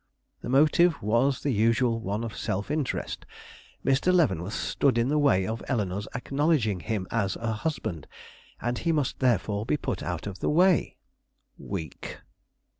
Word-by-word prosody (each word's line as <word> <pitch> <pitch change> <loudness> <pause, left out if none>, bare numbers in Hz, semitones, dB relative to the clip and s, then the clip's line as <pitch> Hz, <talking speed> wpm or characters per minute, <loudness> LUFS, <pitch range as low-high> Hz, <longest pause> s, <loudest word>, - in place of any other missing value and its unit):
"The - - -6
motive 155 +6 +4
was 120 +6 +2
the 145 - +1
usual 115 +2 +2
one 105 0 -3
of 115 -2 -5
self 100 +8 -3
interest. 150 -4 -2 0.6
Mr. 135 +7 +3
Leavenworth 110 - +1
stood 135 -4 +1
in 120 +2 +2
the 150 +1 +2
way 95 -11 +3
of 110 +3 -3
Eleanore's 100 -5 -1
acknowledging 135 - +1
him 105 -1 -3
as 100 -4 0
a 115 -1 -2
husband, 110 - -3 0.5
and 120 +1 -2
he 170 - 0
must 150 -5 -1
therefore 105 -5 +1
be 140 +6 0
put 100 - -3
out 85 +1 -4
of 100 -2 -6
the - - 0
way." 180 +2 +3 0.6
"Weak!" 80 -8 -6
115 Hz, 155 wpm, -27 LUFS, 100-145 Hz, 0.6 s, motive